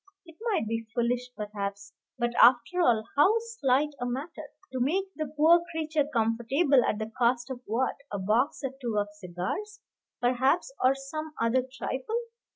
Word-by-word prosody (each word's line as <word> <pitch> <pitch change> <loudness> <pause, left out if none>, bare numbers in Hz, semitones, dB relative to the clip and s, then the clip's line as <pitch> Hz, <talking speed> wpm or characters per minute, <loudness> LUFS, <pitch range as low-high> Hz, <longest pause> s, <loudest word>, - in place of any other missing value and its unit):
It 330 - -14 0.2
might 385 - +1
be 225 0 -3
foolish, 245 +1 0
perhaps; 200 -1 -5 0.2
but 240 -1 0
after 245 +8 +5
all, 230 -8 +3
how 335 +10 +5
slight 300 - 0
a 245 - -2
matter. 270 +7 -5 0.2
To 260 - -3
make 380 +9 0
the 310 -1 -3
poor 330 +3 +6
creature 310 -3 -1
comfortable 240 +5 +2
at - - 0
the 220 0 -5
cost 240 +1 +2
of 250 -1 -6
what, 240 +5 0
a 205 - -2
box 220 +10 +1
or 270 -1 -2
two 235 -4 -2
of 205 0 0
cigars, 190 - -5 0.4
perhaps, 260 - +1
or 260 +1 +5
some 305 +3 -6
other 235 +3 +2
trifle. 270 - -3
255 Hz, 165 wpm, -28 LUFS, 230-310 Hz, 0.4 s, poor